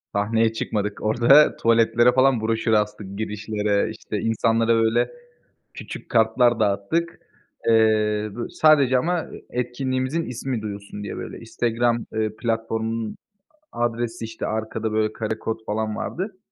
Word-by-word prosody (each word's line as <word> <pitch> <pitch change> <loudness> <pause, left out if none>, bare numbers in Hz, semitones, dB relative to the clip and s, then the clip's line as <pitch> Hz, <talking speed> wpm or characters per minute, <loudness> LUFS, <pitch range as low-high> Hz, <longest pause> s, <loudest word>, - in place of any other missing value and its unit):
Sahneye 110 +2 +2
çıkmadık, 105 -2 -3
orada, 120 +7 +5
tuvaletlere 115 +1 +4
falan 130 -2 +3
broşür 110 0 0
astık, 105 -2 -1
girişlere. 105 -1 -1
İşte, - - -5
insanlara, 115 0 +2
böyle, 115 - +2 0.6
küçük - - -8
kartlar 115 +1 +3
dağıttık. 105 +13 0 0.5
Eee, 110 -1 +3
bö 120 - -4
sadece 140 -5 +4
ama 170 +3 -1 0.2
etkinliğimizin 130 +5 -2
ismi 125 -2 -4
duyulsun 100 0 -7
diye, - - -5
böyle, - - -7
Instagram, 115 0 -1
eee, 110 -1 -1
platformunun 115 -1 -2 0.6
adresi, 120 -1 -2
işte, 110 0 -6
arkada, 110 0 -3
böyle, 110 0 +1
karekod 110 0 -4
falan 110 0 -2
vardı. 190 +2 -4
115 Hz, 120 wpm, -23 LUFS, 110-120 Hz, 0.6 s, orada